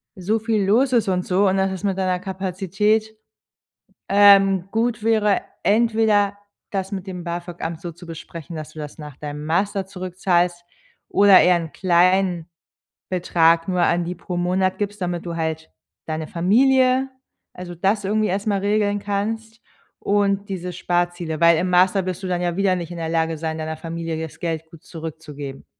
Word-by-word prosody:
so 205 Hz, +4 st, -1 dB
viel 220 Hz, -2 st, 0 dB
los 250 Hz, +7 st, +3 dB
ist 230 Hz, -4 st, +3 dB
und 180 Hz, -1 st, 0 dB
so, 195 Hz, +2 st, +2 dB
und 190 Hz, +1 st, +2 dB
dass 190 Hz, 0 st, +1 dB
es 190 Hz, +1 st, -6 dB
mit 195 Hz, -2 st, 0 dB
deiner 185 Hz, -1 st, 0 dB
Kapazität, 195 Hz, +3 st, -1 dB, 0.9 s
ähm, 195 Hz, -2 st, +6 dB
gut 230 Hz, 0 st, 0 dB
wäre, 215 Hz, -3 st, +2 dB, 0.2 s
entweder 215 Hz, -2 st, +2 dB, 0.3 s
das 195 Hz, 0 st, -3 dB
mit 195 Hz, -1 st, -5 dB
dem 180 Hz, -2 st, -6 dB
BAföG-Amt 170 Hz, -1 st, -5 dB
so 175 Hz, -, -5 dB
zu 175 Hz, +2 st, -14 dB
besprechen, 165 Hz, 0 st, -9 dB
dass 155 Hz, 0 st, -7 dB
du 155 Hz, -, -10 dB
das 150 Hz, +1 st, -8 dB
nach 150 Hz, -2 st, -9 dB
deinem 150 Hz, 0 st, -6 dB
Master 195 Hz, +4 st, 0 dB
zurückzahlst, 180 Hz, -2 st, -1 dB, 0.5 s
oder 200 Hz, -2 st, +7 dB
eher 180 Hz, -1 st, +4 dB
'n 165 Hz, -3 st, -6 dB
kleinen 180 Hz, -1 st, +2 dB, 0.6 s
Betrag 170 Hz, -1 st, +2 dB
nur 180 Hz, -1 st, +1 dB
an 175 Hz, 0 st, +2 dB
die 175 Hz, -, -4 dB
pro 180 Hz, +1 st, -6 dB
Monat 185 Hz, +1 st, 0 dB
gibst, 205 Hz, 0 st, -3 dB
damit 175 Hz, -1 st, -3 dB
du 170 Hz, -1 st, -4 dB
halt 160 Hz, -1 st, -3 dB, 0.4 s
deine 155 Hz, 0 st, -3 dB
Familie 255 Hz, +8 st, +3 dB, 0.4 s
also 180 Hz, -1 st, -8 dB
das 195 Hz, +4 st, 0 dB
irgendwie 215 Hz, +1 st, +1 dB
erst 195 Hz, +3 st, -2 dB
mal 200 Hz, -2 st, +1 dB
regeln 205 Hz, 0 st, +1 dB
kannst 220 Hz, +3 st, -3 dB, 0.4 s
und 200 Hz, 0 st, 0 dB
diese 180 Hz, -2 st, -4 dB
Sparziele. 175 Hz, -2 st, -2 dB
Weil 170 Hz, -1 st, +6 dB
im 180 Hz, +2 st, 0 dB
Master 185 Hz, +1 st, +3 dB
wirst 185 Hz, +1 st, -4 dB
du -, -, -4 dB
dann 180 Hz, -1 st, -1 dB
ja 175 Hz, 0 st, -1 dB
wieder 195 Hz, -2 st, +2 dB
nicht 170 Hz, -2 st, -5 dB
in -, -, -7 dB
der 165 Hz, -1 st, -3 dB
Lage 165 Hz, -1 st, 0 dB
sein, 160 Hz, 0 st, -3 dB
deiner 155 Hz, 0 st, -4 dB
Familie 165 Hz, -1 st, -4 dB
das 160 Hz, -, -8 dB
Geld 165 Hz, -2 st, -3 dB
gut 165 Hz, -1 st, -15 dB
zurückzugeben. 150 Hz, -4 st, -8 dB
185 Hz, 175 wpm, -22 LUFS, 170-200 Hz, 0.9 s, oder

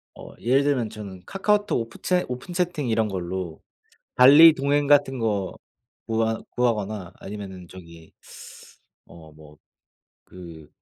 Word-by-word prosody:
어 -, -, -12 dB
예를 135 Hz, +4 st, +2 dB
들면 130 Hz, -6 st, 0 dB
저는 95 Hz, -4 st, -10 dB
카카오톡 205 Hz, -, 0 dB
오프 115 Hz, +1 st, -10 dB
채 180 Hz, -1 st, +1 dB
오픈 125 Hz, +8 st, -7 dB
채팅 175 Hz, -6 st, -2 dB
이런 110 Hz, -1 st, +1 dB
걸로 90 Hz, -3 st, -5 dB, 0.5 s
발리 145 Hz, +6 st, +8 dB
동행 140 Hz, +1 st, 0 dB
같은 135 Hz, -3 st, +3 dB
거 100 Hz, -5 st, -2 dB, 0.5 s
구하 110 Hz, 0 st, -1 dB
구하거나 105 Hz, -6 st, -2 dB
아니면은 95 Hz, -3 st, -9 dB
저기 85 Hz, -3 st, -14 dB, 0.9 s
어 80 Hz, -2 st, -15 dB
뭐 75 Hz, -1 st, -17 dB, 0.7 s
그 85 Hz, -4 st, -13 dB
110 Hz, 245 characters per minute, -24 LUFS, 90-140 Hz, 0.9 s, 발리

